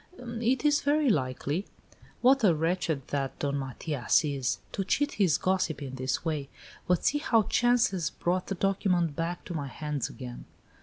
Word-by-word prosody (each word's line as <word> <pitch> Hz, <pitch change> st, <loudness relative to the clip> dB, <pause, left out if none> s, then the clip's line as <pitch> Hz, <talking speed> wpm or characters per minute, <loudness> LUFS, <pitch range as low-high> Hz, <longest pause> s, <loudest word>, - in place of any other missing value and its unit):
"It 240 Hz, +2 st, -1 dB
is 295 Hz, 0 st, +4 dB
very 290 Hz, -2 st, +3 dB
likely." 145 Hz, +4 st, -1 dB, 0.5 s
"What 265 Hz, +1 st, +5 dB
a 180 Hz, -6 st, +5 dB
wretch 165 Hz, +3 st, 0 dB, 0.2 s
that 135 Hz, -2 st, -2 dB
Don 140 Hz, -1 st, -1 dB
Matias 135 Hz, +2 st, 0 dB
is! 140 Hz, -4 st, -1 dB
To 195 Hz, -, -2 dB
cheat 290 Hz, +9 st, +1 dB
his 185 Hz, -8 st, +2 dB
gossip 185 Hz, -4 st, 0 dB
in 135 Hz, -3 st, -6 dB
this 130 Hz, +5 st, -2 dB
way! 150 Hz, -4 st, -2 dB, 0.4 s
But 180 Hz, -2 st, +1 dB
see 295 Hz, -, +3 dB
how 230 Hz, -6 st, +3 dB
chance 240 Hz, +1 st, +3 dB
has 175 Hz, -5 st, -1 dB
brought 180 Hz, +1 st, -1 dB
the 195 Hz, -, -2 dB
document 180 Hz, -4 st, +1 dB
back 170 Hz, +2 st, -3 dB
to 175 Hz, -, -6 dB
my 145 Hz, -4 st, -3 dB
hands 150 Hz, 0 st, -3 dB
again!" 125 Hz, -2 st, -8 dB
175 Hz, 170 wpm, -29 LUFS, 145-220 Hz, 0.5 s, What